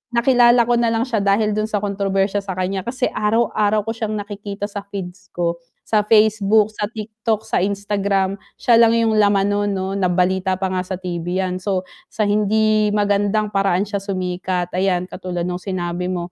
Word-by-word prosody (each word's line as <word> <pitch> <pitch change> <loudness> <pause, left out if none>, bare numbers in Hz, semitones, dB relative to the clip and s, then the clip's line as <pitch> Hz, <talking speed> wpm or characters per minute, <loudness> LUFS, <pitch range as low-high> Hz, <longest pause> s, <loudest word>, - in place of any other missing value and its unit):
nakilala 240 -1 +5
ko 240 0 +1
nalang 230 -1 +1
siya 235 -5 -1
dahil 200 +2 +2
dun 215 +1 -1
sa 210 -2 -2
kontrobersya 200 0 0
sakanya 190 0 -3
kasi 250 +1 -1
araw-araw 215 -1 +1
ko 225 - -2
siyang 220 -1 -3
nakikita 205 0 -5
sa 205 - -5
feeds 195 0 -7
ko. 170 -1 -1 0.3
Sa 215 -1 +2
Facebook, 215 0 +3
sa 210 0 -2
TikTok, 220 0 -3
sa - - 0
Instagram, 200 0 -1 0.2
siya 235 -1 +4
lang 230 0 +5
yung 225 -1 +2
laman 200 -1 +3
non 205 0 0
'no 190 -1 -2
nabalita 185 0 +1
pa 190 -1 -2
nga 185 -1 0
sa 185 0 -5
TV 175 -2 -5
yan 185 0 -1
so 185 -1 -1 0.2
sa 215 - -1
hindi 215 +1 +2
magandang 205 +1 +1
paraan 195 -1 +2
siya 200 -1 -3
sumikat, 180 -2 -3
ayan 180 -1 +1
katulad 180 -2 -5
nung 180 0 -4
sinabi 180 -2 -3
mo. 175 -1 -4
200 Hz, 175 wpm, -20 LUFS, 185-215 Hz, 0.3 s, nakilala